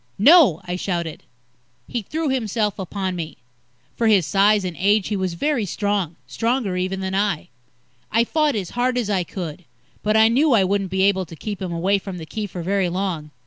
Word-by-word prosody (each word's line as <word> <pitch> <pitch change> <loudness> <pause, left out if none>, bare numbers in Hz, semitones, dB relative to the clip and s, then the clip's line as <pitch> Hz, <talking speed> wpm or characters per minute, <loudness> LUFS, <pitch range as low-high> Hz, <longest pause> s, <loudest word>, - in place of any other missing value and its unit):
"No!" 265 - +6
I 180 0 -3
shouted. 170 -4 -3 0.7
He 240 - -3
threw 310 - -3
himself 220 -5 -1
upon 190 0 -3
me. 165 -2 -6 0.6
For 230 - +1
his 200 -6 +4
size 205 +1 +3
and 180 -2 -4
age, 200 +1 +2
he 210 - -1
was 185 -3 -2
very 285 - 0
strong 200 -3 -1
stronger, 230 -4 -1
even, 185 +1 -2
than 190 0 -3
I. 195 -4 0 0.6
I 230 +1 +4
fought 305 +2 +1
as 195 -5 -3
hard 250 +1 0
as 225 -4 -1
I 190 -3 +1
could, 175 -2 -6 0.4
but 215 +1 +2
I 220 0 +7
knew 270 +5 +3
I 210 -4 +5
wouldn't 195 0 0
be 190 +1 +1
able 190 -2 +2
to 165 - -10
keep 205 +4 -6
him 185 -2 -3
away 185 +4 +1
from 190 -1 -7
the 160 - -7
Key 210 +5 -4
for 180 -3 -6
very 190 0 +1
long. 175 -4 -3
195 Hz, 200 wpm, -22 LUFS, 180-220 Hz, 0.7 s, I